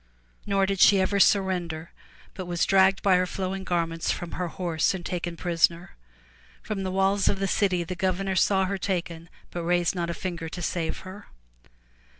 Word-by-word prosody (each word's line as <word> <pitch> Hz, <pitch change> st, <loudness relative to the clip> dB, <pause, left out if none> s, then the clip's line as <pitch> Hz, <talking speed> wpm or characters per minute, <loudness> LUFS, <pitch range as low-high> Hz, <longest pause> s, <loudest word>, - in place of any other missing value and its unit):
Nor 195 Hz, -1 st, +2 dB
did 195 Hz, -1 st, -2 dB
she 195 Hz, +1 st, +7 dB
ever 200 Hz, +2 st, +1 dB
surrender 175 Hz, -5 st, +1 dB, 0.4 s
but 185 Hz, -2 st, -7 dB
was 175 Hz, -1 st, 0 dB
dragged 195 Hz, 0 st, +4 dB
by 190 Hz, -2 st, +5 dB
her 180 Hz, 0 st, +1 dB
flowing 190 Hz, +1 st, -4 dB
garments 165 Hz, -2 st, -1 dB
from 175 Hz, -, -5 dB
her 180 Hz, -, -3 dB
horse 170 Hz, 0 st, -1 dB
and 175 Hz, -2 st, -7 dB
taken 175 Hz, -1 st, -4 dB
prisoner. 170 Hz, 0 st, +1 dB, 0.7 s
From 205 Hz, -2 st, -4 dB
the 190 Hz, -, -2 dB
walls 195 Hz, +1 st, +1 dB
of 200 Hz, -, +2 dB
the 195 Hz, 0 st, -1 dB
city 185 Hz, -2 st, +1 dB
the 185 Hz, -, -5 dB
governor 190 Hz, 0 st, -1 dB
saw 190 Hz, +2 st, +3 dB
her 195 Hz, +1 st, -3 dB
taken 175 Hz, -3 st, -3 dB, 0.2 s
but 175 Hz, -, -4 dB
raised 175 Hz, 0 st, +1 dB
not 170 Hz, -2 st, -3 dB
a 170 Hz, -, -3 dB
finger 170 Hz, -4 st, -5 dB
to 175 Hz, -, -7 dB
save 165 Hz, -2 st, -2 dB
her. 190 Hz, +2 st, -11 dB
185 Hz, 180 wpm, -26 LUFS, 170-195 Hz, 0.7 s, she